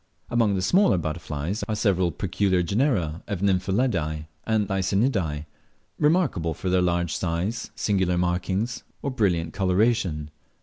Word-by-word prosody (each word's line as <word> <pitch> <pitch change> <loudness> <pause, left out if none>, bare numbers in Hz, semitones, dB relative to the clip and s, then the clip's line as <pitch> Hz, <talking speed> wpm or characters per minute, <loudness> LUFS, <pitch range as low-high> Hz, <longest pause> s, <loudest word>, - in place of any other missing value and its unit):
Among 115 -4 +3
the 95 - -1
smaller 185 - +4
butterflies 80 +3 -3
are 110 - 0
several 95 -5 +2
peculiar 95 +2 0
genera 90 - 0
of 100 -4 -3
Nymphalidae 95 -5 0 0.2
and 110 -2 +2
Lycaenidae, 95 - 0 0.5
remarkable 145 - +2
for 90 +2 -3
their 90 0 +3
large 85 -1 +1
size, 95 +7 -2
singular 95 -4 +1
markings, 95 +6 -1 0.2
or 140 - -1
brilliant 90 -9 0
coloration. 95 -5 +1
95 Hz, 125 wpm, -25 LUFS, 85-110 Hz, 0.5 s, smaller